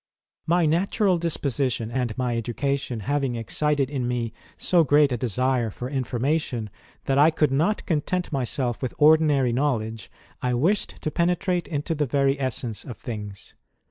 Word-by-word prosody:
"My 170 Hz, +1 st, +3 dB
natural 180 Hz, +3 st, +2 dB
disposition, 135 Hz, -8 st, -1 dB
and 120 Hz, -3 st, -2 dB
my 125 Hz, -2 st, 0 dB
education, 125 Hz, +1 st, -2 dB
ha\'ing 135 Hz, +1 st, -1 dB
excited 140 Hz, +4 st, 0 dB
in 130 Hz, -3 st, -2 dB
me 120 Hz, -2 st, -2 dB, 0.2 s
so 175 Hz, -2 st, +3 dB
great 145 Hz, -1 st, +4 dB
a -, -, +1 dB
desire 125 Hz, +1 st, 0 dB
for 120 Hz, +4 st, -6 dB
information, 130 Hz, -3 st, -1 dB, 0.3 s
that 135 Hz, 0 st, +2 dB
I 150 Hz, +2 st, +7 dB
could 155 Hz, -3 st, +1 dB
not 160 Hz, +10 st, +1 dB
content 175 Hz, +2 st, -1 dB
myself 125 Hz, -3 st, -2 dB
with 130 Hz, -, -3 dB
ordinary 150 Hz, -5 st, +4 dB
knowledge, 115 Hz, -5 st, -1 dB, 0.3 s
I 125 Hz, -1 st, 0 dB
wished 180 Hz, +12 st, 0 dB
to 155 Hz, -, -1 dB
penetrate 180 Hz, +2 st, 0 dB
into 150 Hz, 0 st, -2 dB
the 150 Hz, -2 st, -1 dB
very 140 Hz, +2 st, +1 dB
essence 120 Hz, -5 st, -3 dB
of 120 Hz, -, -8 dB
things. 105 Hz, -4 st, -7 dB
135 Hz, 150 wpm, -25 LUFS, 120-155 Hz, 0.3 s, I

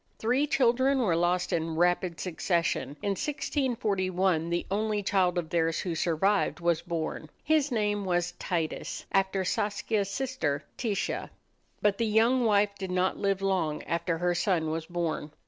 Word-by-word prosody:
Three 255 Hz, +6 st, +1 dB
children 260 Hz, 0 st, +3 dB
were 210 Hz, -10 st, +2 dB
lost 175 Hz, +2 st, +1 dB
in 165 Hz, -1 st, -1 dB
rapid 175 Hz, 0 st, +1 dB
succession. 170 Hz, -4 st, -1 dB
In 200 Hz, -, +1 dB
1641 195 Hz, -, 0 dB
the 175 Hz, 0 st, -1 dB
only 210 Hz, 0 st, 0 dB
child 185 Hz, -2 st, +2 dB
of 165 Hz, -2 st, -3 dB
theirs 165 Hz, -1 st, +1 dB
who 175 Hz, -, -2 dB
survived 180 Hz, +6 st, +1 dB
was 170 Hz, -1 st, +1 dB
born. 165 Hz, -2 st, -4 dB
He 310 Hz, -, +1 dB
was 295 Hz, -3 st, +2 dB
named 205 Hz, -3 st, 0 dB, 0.3 s
Titus, 165 Hz, -3 st, -3 dB
after 195 Hz, 0 st, +1 dB
Saskia's 205 Hz, +1 st, -1 dB
sister 200 Hz, -, -2 dB
Titia. 220 Hz, -5 st, -2 dB, 0.5 s
But 205 Hz, -1 st, +2 dB
the 230 Hz, -, +1 dB
young 230 Hz, +4 st, +3 dB
wife 205 Hz, -1 st, +3 dB
did 190 Hz, -1 st, -4 dB
not 180 Hz, +1 st, +1 dB
live 195 Hz, -1 st, 0 dB
long 175 Hz, -6 st, 0 dB
after 170 Hz, 0 st, -1 dB
her 175 Hz, +1 st, +1 dB
son 170 Hz, -3 st, +1 dB
was 160 Hz, 0 st, -3 dB
born. 165 Hz, -4 st, -3 dB
190 Hz, 150 wpm, -28 LUFS, 170-210 Hz, 0.5 s, children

